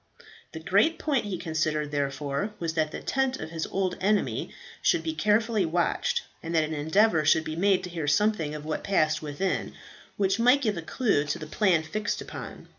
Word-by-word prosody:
The 160 - -6
great 205 - +2
point 280 -7 0
he 195 -3 -3
considered, 155 -2 -1
therefore, 140 +7 -2
was 165 -1 -3
that 155 -1 +1
the - - -6
tent 265 -1 0
of 155 - -6
his 165 -1 -3
old 190 -2 -1
enemy 205 +2 +1 0.3
should 340 - +2
be 320 - -2
carefully 220 -3 +2
watched, 175 - 0 0.2
and 165 0 -4
that 160 - +4
an 155 +1 -3
endeavour 160 +3 +3
should 160 +2 +4
be 155 0 -5
made 190 +2 +2
to 180 - -5
hear 165 -4 -3
something 165 -2 +1
of 150 0 -7
what 155 - -3
passed 155 -6 +1
within, 155 +6 -2 0.4
which 195 +1 +1
might 250 +4 +5
give 215 -4 +1
a 170 - -4
clue 180 - +1
to 145 - -2
the 155 - -7
plan 175 0 +2
fixed 205 +6 -3
upon. - - -8
175 Hz, 195 wpm, -27 LUFS, 155-210 Hz, 0.4 s, might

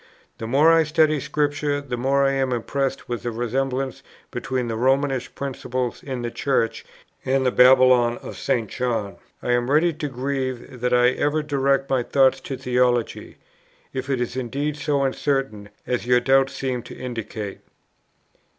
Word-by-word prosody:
The 110 - -5
more 145 +7 +5
I 165 - +5
study 155 -1 +2
Scripture, 145 0 -1
the 140 -3 -5
more 135 +3 +2
am 135 -1 0
I - - +1
impressed 135 +3 -2
with 120 -3 -3
the 120 - -3
resemblance 130 +3 -2 0.3
between 130 -2 -2
the 115 - -2
Romish 135 +2 0
principle 130 -2 -3
in 130 -3 -5
the 120 - -3
Church 125 -4 0 0.4
and 130 0 +1
the 125 - +3
Babylon 125 -2 +5
of - - -9
St. 115 -3 -1
John.... 115 -4 -2 0.3
I 125 - 0
am 120 +1 +1
ready 160 +4 +3
to 150 -1 -4
grieve 130 -1 -4
that 125 0 0
I 125 0 +5
ever 150 +4 0
directed 140 -2 +1
my 130 -2 +3
thoughts 135 +1 +3
to 135 0 -5
theology, 125 -2 0 0.6
if 130 +1 -4
it 135 -2 0
is 125 0 -3
indeed 140 +4 -2
so 145 -1 0
uncertain, 135 -6 -1 0.2
as 125 -1 -2
your 125 0 +5
doubts 135 +2 +3
seem 130 -2 -2
to 120 - -11
indicate." 115 -5 -6
130 Hz, 165 wpm, -23 LUFS, 125-140 Hz, 0.6 s, more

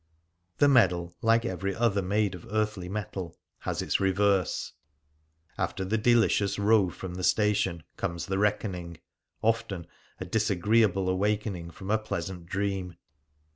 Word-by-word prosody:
The 145 - +5
medal, 90 -10 +3
like 115 +1 +3
every 95 -1 -2
other 110 -4 +2
made 100 +1 +1
of 90 - -10
earthly 105 -4 -1
metal, 95 -4 -5 0.2
has - - -3
its - - 0
reverse. 95 -1 +1 0.9
After 95 +1 -1
the 110 +4 0
delicious 110 -3 +3
row 105 -2 +4
from 90 +1 -7
the 90 +1 -5
station 100 -6 +2
comes 85 -1 -3
the 95 0 -1
reckoning 95 -5 -1 0.2
— - - -52
often 110 -6 0 0.3
a - - -4
disagreeable 105 0 +2
awakening 100 -2 -1
from 95 +4 -6
a 110 - +3
pleasant 95 -5 -5
dream. 95 -2 -2
100 Hz, 135 wpm, -28 LUFS, 90-105 Hz, 0.9 s, The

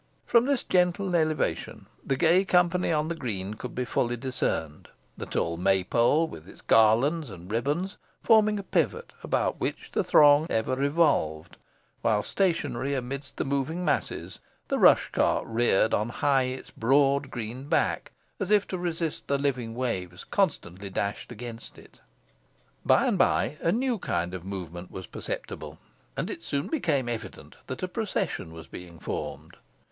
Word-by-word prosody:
From 235 0 +4
this 275 -2 +1
gentle 180 +1 +1
elevation 155 - -1 0.2
the 135 - 0
gay 165 +7 +4
company 180 -1 +2
on 155 -1 +1
the 170 - -1
green 105 - -4
could 120 +3 -8
be 125 - -1
fully 120 0 0
discerned, 115 - -2 0.3
the - - -7
tall 85 0 -1
May 95 +1 +2
pole, 120 - +3
with 80 - -11
its - - -15
garlands 120 +8 +3
and 90 -1 -10
ribands, 145 - -1 0.2
forming 215 -2 +4
a 200 - -4
pivot, 470 - -1
about - - 0
which - - -3
the - - +1
throng 145 +1 +6
ever 110 +3 0
revolved, 140 - +1 0.5
while 105 -2 +2
stationary 150 -8 0
amidst 135 +1 -5
the - - -1
moving 140 +6 -1
masses, 150 - -2 0.3
the - - 0
rush - - +5
cart - - +2
reared 115 -2 +2
on 105 +3 +1
high 135 +1 +2
its 130 +1 -6
broad 140 +3 +2
green 120 +3 -6
back, 160 - +1 0.3
as - - -2
if 210 -1 +4
to 185 - -3
resist 165 -2 -3
the 140 - +2
living 125 -5 -2
waves 95 -8 -3
constantly 100 - -1
dashed 100 +2 -3
against 115 0 -9
it. - - -17 0.8
By - - +4
and - - +1
by 150 - +2
a 165 - +2
new 245 +1 0
kind 90 - -2
of 90 -2 -6
movement 90 -2 -6
was 95 - -7
perceptible, - - -6 0.4
and - - -2
it - - -7
soon 140 0 -2
became 155 - 0
evident 120 -2 -6
that - - -5
a - - 0
procession 80 - -3
was 80 -1 -10
being 85 +1 -10
formed. - - -6
135 Hz, 160 wpm, -27 LUFS, 105-165 Hz, 0.8 s, throng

